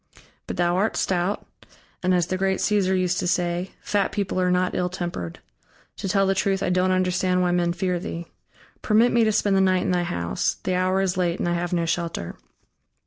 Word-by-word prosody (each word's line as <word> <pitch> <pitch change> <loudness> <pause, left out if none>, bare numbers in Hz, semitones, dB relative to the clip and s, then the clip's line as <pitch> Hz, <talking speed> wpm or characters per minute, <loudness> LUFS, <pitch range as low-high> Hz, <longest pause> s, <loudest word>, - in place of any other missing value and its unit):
But - - -5
thou 175 0 +2
art 205 +4 0
stout, 185 +2 0 0.6
and, 185 - +1
as 175 -2 +3
the 185 - -2
great 190 0 0
Cæsar 190 -3 +1
used 180 0 0
to - - -1
say, 175 +1 -1
fat 205 -1 0
people 195 -3 -1
are 180 - +2
not 180 0 +1
ill 180 0 0
tempered; 175 - -5 0.6
to 195 - -4
tell 195 +1 +3
the 195 - +2
truth, 195 0 0
I - - 0
don't 180 +1 +2
understand 185 0 +1
why 180 - +2
men 175 -1 +1
fear 180 0 -1
thee. 170 -1 -5 0.6
Permit 225 +3 +4
me 235 -1 +4
to 215 - +3
spend 205 -1 +2
the 190 - +4
night 185 -1 +3
in - - 0
thy 180 -1 +2
house; 85 - -1
the 185 - -1
hour 185 +1 +1
is 185 -1 0
late, 175 -1 +1
and - - -2
I 175 - +1
have 175 0 -2
no 170 -2 +1
shelter." 165 - -3
185 Hz, 215 wpm, -24 LUFS, 175-190 Hz, 0.6 s, Permit